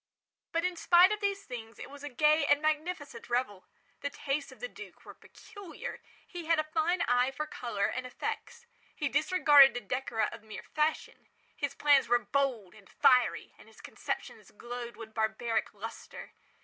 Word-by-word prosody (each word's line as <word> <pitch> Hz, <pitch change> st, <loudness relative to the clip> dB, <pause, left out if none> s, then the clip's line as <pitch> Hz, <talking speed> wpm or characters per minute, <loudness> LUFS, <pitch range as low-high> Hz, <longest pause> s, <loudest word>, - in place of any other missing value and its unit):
But, 335 Hz, +1 st, 0 dB
in 365 Hz, -1 st, -1 dB
spite 355 Hz, +3 st, +6 dB
of 425 Hz, -, -1 dB
these 400 Hz, 0 st, -1 dB
things, 230 Hz, -3 st, -8 dB
it -, -, -8 dB
was 285 Hz, +1 st, -12 dB
a 290 Hz, -, -5 dB
gay 300 Hz, +4 st, +3 dB
and 290 Hz, -, +4 dB
magnificent 305 Hz, -5 st, -3 dB
revel. 240 Hz, -6 st, -2 dB, 0.3 s
The 285 Hz, -, -3 dB
tastes 285 Hz, +1 st, -3 dB
of -, -, -15 dB
the -, -, -4 dB
duke -, -, -13 dB
were -, -, -10 dB
peculiar. 395 Hz, -6 st, -10 dB, 0.2 s
He 350 Hz, -2 st, -8 dB
had 330 Hz, -1 st, +4 dB
a -, -, +2 dB
fine 325 Hz, +3 st, 0 dB
eye 245 Hz, +1 st, +2 dB
for 305 Hz, +3 st, -4 dB
colours 235 Hz, -9 st, -2 dB
and 255 Hz, 0 st, -4 dB
effects. 470 Hz, -, -6 dB, 0.3 s
He -, -, -1 dB
disregarded 290 Hz, -8 st, +6 dB
the 245 Hz, +1 st, -2 dB
decora 230 Hz, -4 st, -2 dB
of -, -, -10 dB
mere 215 Hz, 0 st, -9 dB
fashion. 305 Hz, 0 st, -2 dB, 0.3 s
His 285 Hz, -1 st, -3 dB
plans 285 Hz, -4 st, +4 dB
were 240 Hz, +1 st, +4 dB
bold 240 Hz, -4 st, -1 dB
and 210 Hz, -3 st, -18 dB
fiery, 250 Hz, -1 st, +3 dB
and -, -, -16 dB
his -, -, -18 dB
conceptions -, -, -6 dB
glowed 240 Hz, 0 st, -8 dB
with 220 Hz, -1 st, -10 dB
barbaric 220 Hz, +1 st, -1 dB
lustre. 225 Hz, +2 st, -9 dB
275 Hz, 175 wpm, -30 LUFS, 235-315 Hz, 0.3 s, spite